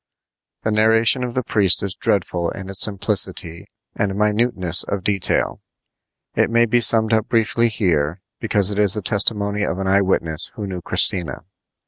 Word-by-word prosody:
The 110 - -1
narration 115 +4 +2
of 125 -1 -6
the 130 - -1
priest 100 -6 +2
is 100 -2 -3
dreadful 90 -4 -2
in 95 -1 -9
its 95 - +1
simplicity 85 -4 0 0.3
and 95 -1 -2
minuteness 105 -4 +1
of 100 -2 -5
detail. 100 -2 -1 0.7
It - - 0
may 115 +1 +2
be 120 +2 +1
summed 115 -1 +3
up 110 -1 0
briefly 115 0 +1
here, 90 -4 -2 0.2
because 105 -3 +1
it 100 - -4
is 100 -1 +2
the 105 - -5
testimony 105 0 +1
of 90 - -3
an 95 - -4
eye 95 +1 +2
witness 85 -4 -2
who 105 - -6
knew 95 -2 -7
Christina. 85 0 +1
100 Hz, 165 wpm, -19 LUFS, 95-110 Hz, 0.7 s, summed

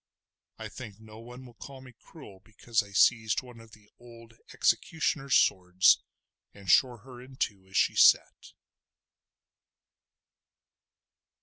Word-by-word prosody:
I - - -8
think 110 -5 -12
no 110 0 -15
one 125 +3 -13
will 120 - -15
call 135 +4 -13
me 130 -1 -15
cruel 115 - -16
because 110 +1 -3
I 100 - -14
seized 110 +3 +1
one 125 -2 -15
of 115 -1 -18
the 105 -1 -19
old 115 -1 -16 0.2
executioner's 150 -4 -1
swords 90 0 +2 0.5
and 100 -1 -15
shore 125 -4 +2
her 125 0 -14
in 130 +1 -15
two 100 -6 -5
as 95 - -6
she - - +2
sat. - - +2
115 Hz, 130 wpm, -27 LUFS, 105-125 Hz, 0.5 s, swords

